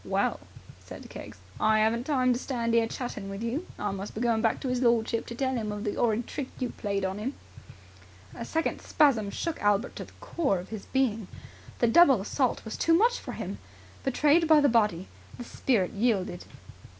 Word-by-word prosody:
"Well," - - 0 0.4
said - - -11
Keggs, - - -9 0.2
"I 215 0 +3
haven't 225 +3 +1
time 255 -4 +2
to 240 - -2
stand 235 -4 -2
'ere 230 -1 +3
chatting 220 -5 -5
with 195 +3 -6
you. 260 +10 -3
I 205 -1 -2
must 195 +1 -6
be 215 - -4
going 230 -2 +2
back 225 -1 +1
to 265 - -2
'is 250 0 -1
lordship, 230 -2 +1
to 235 - -6
tell 260 +1 -1
'im 215 -3 -2
of 210 0 -5
the 210 - -2
'orrid 235 0 +1
trick 280 - -5
you 255 - -2
played 200 -2 -2
on 190 +2 -3
him." 255 +6 -3 1.0
A - - -6
second 325 0 -2
spasm 250 -10 +2
shook 330 +9 -4
Albert 205 +3 +1
to - - -5
the - - -18
core 340 - -1
of 180 +1 -8
his 215 -3 -7
being. 225 -7 0 0.5
The 240 - +2
double 270 - +6
assault 245 +6 -1
was 220 - -5
too 330 - +3
much 470 +7 +3
for - - -7
him. - - -6 0.4
Betrayed 300 +5 +3
by 310 -1 +7
the 290 - +4
body, 210 -6 +2 0.3
the 245 - -6
spirit 230 -6 0
yielded. 200 -5 -1
235 Hz, 200 wpm, -28 LUFS, 210-265 Hz, 1.0 s, by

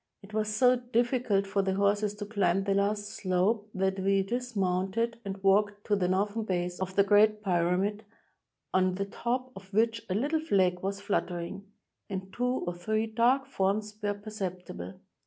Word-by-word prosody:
It 200 +2 -14
was 215 0 0
so 250 +3 +4
difficult 240 -4 +1
for 195 0 0
the 190 -1 0
horses 205 +1 +1
to 205 0 -5
climb 195 -3 +1
the 195 0 +1
last 205 +1 +1
slope 205 +2 0
that 190 0 0
we 195 0 +2
dismounted 225 0 -1
and 195 -1 -4
walked 205 +1 +3
to 210 - +2
the 185 -3 +1
northern 205 +4 0
base 180 -4 -2
of 190 0 -4
the 200 - +6
Great 210 +1 +4
Pyramid, 185 +3 +1 0.7
on 185 0 +3
the 200 +1 -2
top 250 +5 -3
of 195 0 -12
which 225 +2 +2
a 185 - 0
httle 295 +8 +1
flag 185 - +2
was 195 +2 -3
fluttering, 185 -1 -2 0.4
and 190 -1 -5
two 250 +1 0
or 175 - -2
three 215 +6 -1
dark 240 +5 +2
forms 210 -4 -1
were 205 -1 0
perceptible. 185 - -6
200 Hz, 170 wpm, -29 LUFS, 190-220 Hz, 0.7 s, the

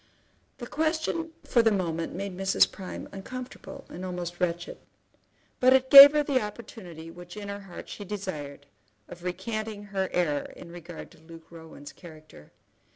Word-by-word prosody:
The 245 - -7
question 315 +3 -1
for 240 - +3
the 225 -1 +3
moment 165 -4 -2
made 195 0 -5
Mrs. 190 +1 +3
Prime 190 -2 -8
uncomfortable 255 +6 -9
and 180 - -9
almost 175 -1 -5
wretched, 175 -1 -2 0.8
but 255 +1 +6
it 260 0 +2
gave 280 +1 +13
her 300 0 +2
the 275 -3 +1
opportunity 195 -7 -9
which 175 +2 -12
in 205 -1 -7
her 200 0 -5
heart 195 -3 -11
she 205 - -8
desired 160 -9 -6 0.4
of 175 0 -12
recanting 205 +3 -4
her 195 -2 -3
error 150 -5 -1
in 170 - -12
regard 175 -1 -10
to - - -19
Luke 165 0 -15
Rowan's 160 -3 -12
character. 155 - -15
185 Hz, 160 wpm, -27 LUFS, 170-225 Hz, 0.8 s, gave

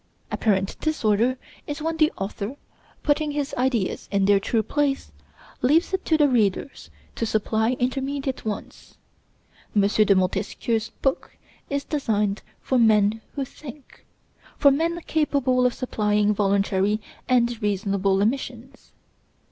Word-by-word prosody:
Apparent 195 -3 0
disorder 245 -5 +1 0.3
is 290 +1 -4
when 320 +1 -2
the 310 -1 +4
author, 200 +5 -4 0.5
putting 300 +1 +1
his 290 0 -2
ideas 245 -6 -1
in 200 -1 +2
their 200 0 +5
true 220 +2 0
place, 280 +4 -1 0.5
leaves 315 +9 +3
it 380 - 0
to 320 - +3
the 295 -1 +5
readers 235 0 0 0.2
to - - -4
supply 220 +1 +1
intermediate 270 +2 -2
ones. 215 -2 -6 0.8
M. 205 - +5
de 205 0 +4
Montesquieu's 205 +4 -1
book 270 - -1 0.3
is 280 0 -1
designed 210 -9 -1 0.2
for 260 - +1
men 215 -1 +4
who 275 -2 -2
think, 275 +1 -13 0.5
for 280 - +6
men 330 +4 0
capable 275 -6 +1
of 245 - -2
supplying 210 -4 +1
voluntary 200 0 +1 0.3
and 240 -2 +2
reasonable 200 -1 +1
omissions. 255 +2 -4
235 Hz, 125 wpm, -24 LUFS, 205-280 Hz, 0.8 s, for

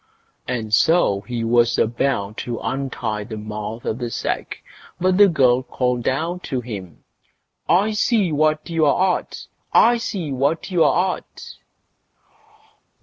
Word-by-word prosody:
And 115 -4 -3
so 110 - +3
he 120 -2 -3
was 120 +1 +3
about 110 -3 0
to 120 -1 -4
untie 125 -6 -3
the 110 +1 -7
mouth 105 +1 -6
of 110 - -2
the 120 -1 -3
sack, - - -4 0.4
but 185 +1 +2
the 205 - +8
girl 130 -7 +3
called 125 -1 -2
out 165 +7 -1
to 130 - -2
him: 100 -9 -8 0.7
I 200 +5 +3
see 210 -3 +1
what 155 +1 +1
you're 170 +3 +2
at! - - -11 0.3
I 240 +1 +5
see 190 -9 -4
what 140 +8 -1
you're 180 +1 +3
at! - - -13
130 Hz, 135 wpm, -21 LUFS, 115-170 Hz, 0.7 s, the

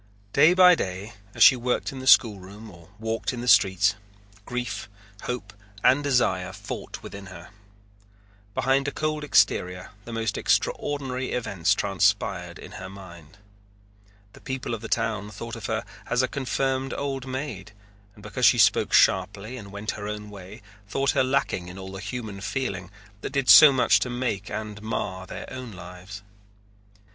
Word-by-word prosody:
Day 155 +6 +6
by 180 -1 +8
day 100 - -4 0.2
as - - +5
she 135 - +9
worked 125 0 -1
in 135 - -8
the 130 - -7
schoolroom 105 -2 +3
or 85 0 -16
walked 110 +2 -3
in 120 - -5
the 125 - -5
streets, 95 -1 +5 0.5
grief, 120 -5 -4 0.4
hope, 115 -4 -5 0.3
and 130 +3 +4
desire 110 -10 +1
fought - - -7
within 100 0 -9
her. 90 -2 -11 1.1
Behind 135 +2 +1
a - - -1
cold 155 0 -2
exterior 90 -7 +1
the 120 - -8
most 115 -1 -2
extraordinary 130 -3 -1
events 100 -6 0
transpired 100 -3 0
in - - -11
her 95 - -7
mind. 85 -3 -13 1.0
The - - -16
people 130 -2 -4
of 110 - -4
the 115 - -6
town 110 -3 -1
thought 115 +3 -7
of - - -6
her - - -2 0.2
as 125 +2 +1
a - - +1
confirmed 135 0 -2
old 135 -2 -4
maid 130 -7 -5 0.4
and 105 - -16
because 120 +4 +2
she 120 - +5
spoke 105 -3 +3
sharply 100 +5 +2
and 100 -5 -9
went 100 +2 -4
her 105 0 -7
own 105 0 -6
way 100 +3 -11 0.2
thought 135 +6 0
her - - +2
lacking 130 -9 -1
in 90 +1 -9
all 95 0 -8
the 95 - -7
human 105 -1 -6
feeling 95 -3 -3 0.3
that - - -6
did 135 -2 0
so 155 - +10
much 125 -6 +4
to 125 - -2
make 120 -5 -3
and 105 -1 -6
mar 95 -4 -4
their - - -7
own 130 -3 -7
lives. 90 +3 -10
110 Hz, 165 wpm, -25 LUFS, 95-130 Hz, 1.1 s, so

